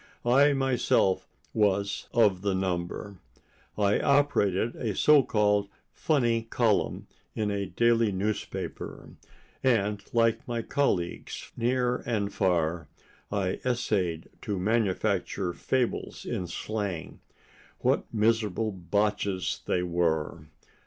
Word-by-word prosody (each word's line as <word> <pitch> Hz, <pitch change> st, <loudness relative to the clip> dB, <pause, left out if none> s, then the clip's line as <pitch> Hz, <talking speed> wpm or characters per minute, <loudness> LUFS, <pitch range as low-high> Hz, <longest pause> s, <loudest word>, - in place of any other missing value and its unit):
I 140 Hz, +4 st, +5 dB
myself 130 Hz, -8 st, +1 dB, 0.3 s
was 100 Hz, -2 st, 0 dB
of 105 Hz, -6 st, +3 dB
the 100 Hz, -1 st, 0 dB
number. 95 Hz, +1 st, -3 dB, 0.6 s
I 105 Hz, -1 st, +3 dB
operated 120 Hz, -7 st, +2 dB
a 110 Hz, -5 st, -3 dB
so 150 Hz, -1 st, +6 dB
called 105 Hz, -4 st, +1 dB, 0.2 s
funny 120 Hz, -7 st, +1 dB
column 115 Hz, -1 st, 0 dB, 0.3 s
in 105 Hz, -1 st, -1 dB
a 100 Hz, -1 st, -2 dB
daily 115 Hz, +3 st, +2 dB
newspaper, 100 Hz, +3 st, -4 dB, 0.5 s
and 105 Hz, -5 st, +1 dB
like 115 Hz, -1 st, +2 dB
my 120 Hz, -2 st, -2 dB
colleagues 100 Hz, -, -2 dB
near 125 Hz, +1 st, +1 dB
and 105 Hz, -4 st, -2 dB
far, 85 Hz, -3 st, 0 dB, 0.4 s
I 95 Hz, -3 st, -1 dB
essayed 100 Hz, -9 st, -1 dB
to 100 Hz, -, -3 dB
manufacture 100 Hz, -2 st, 0 dB
fables 130 Hz, +4 st, -2 dB
in 90 Hz, -, -3 dB
slang. 100 Hz, -4 st, -4 dB, 0.6 s
What -, -, +1 dB
miserable 110 Hz, -1 st, +1 dB
botches 100 Hz, +1 st, -1 dB
they 90 Hz, -, +1 dB
were! 85 Hz, -2 st, -1 dB
105 Hz, 105 wpm, -28 LUFS, 95-115 Hz, 0.6 s, so